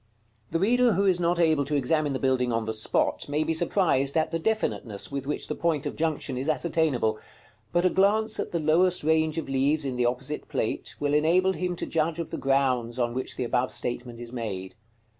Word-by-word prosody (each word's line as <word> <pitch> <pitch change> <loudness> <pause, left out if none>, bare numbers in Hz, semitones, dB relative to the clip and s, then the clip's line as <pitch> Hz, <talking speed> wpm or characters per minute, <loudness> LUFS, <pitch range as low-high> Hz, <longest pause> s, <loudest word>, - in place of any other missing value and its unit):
§ - - -39 0.5
CXXX. - - -20
The 165 - +1
reader 240 +4 +3
who 195 +2 +1
is 185 -2 +3
not 175 0 +1
able 160 -4 +3
to 145 +2 -2
examine 145 +2 +1
the - - -1
building 130 -2 +1
on 115 -1 -1
the 110 - -2
spot 110 +5 0
may 150 +2 +1
be 160 - -1
surprised 160 -5 +1
at 160 0 +1
the 165 - -1
definiteness 160 - -1
with 140 -1 -4
which 150 - -2
the - - -2
point 160 -4 -1
of 145 - -3
junction 155 -5 -2
is 135 +4 -2
ascertainable; 150 -8 +1 0.5
but 175 +1 +1
a - - +5
glance 215 +3 +2
at - - -3
the 170 - -1
lowest 170 +3 +3
range 160 0 +2
of 165 - -3
leaves 140 +3 +1
in 130 -2 -3
the 120 -1 +2
opposite 125 +5 -3
Plate - - -3
(XX.) - - -29
will 145 0 0
enable 175 +5 +3
him 180 -1 -2
to - - -3
judge 160 0 -1
of 170 -2 -5
the - - -3
grounds 130 -3 +1
on 120 -1 0
which 130 +1 -4
the - - -2
above 125 +1 0
statement 120 -1 -3
is 120 0 -8
made. 100 -6 -5
150 Hz, 230 wpm, -26 LUFS, 125-170 Hz, 0.5 s, a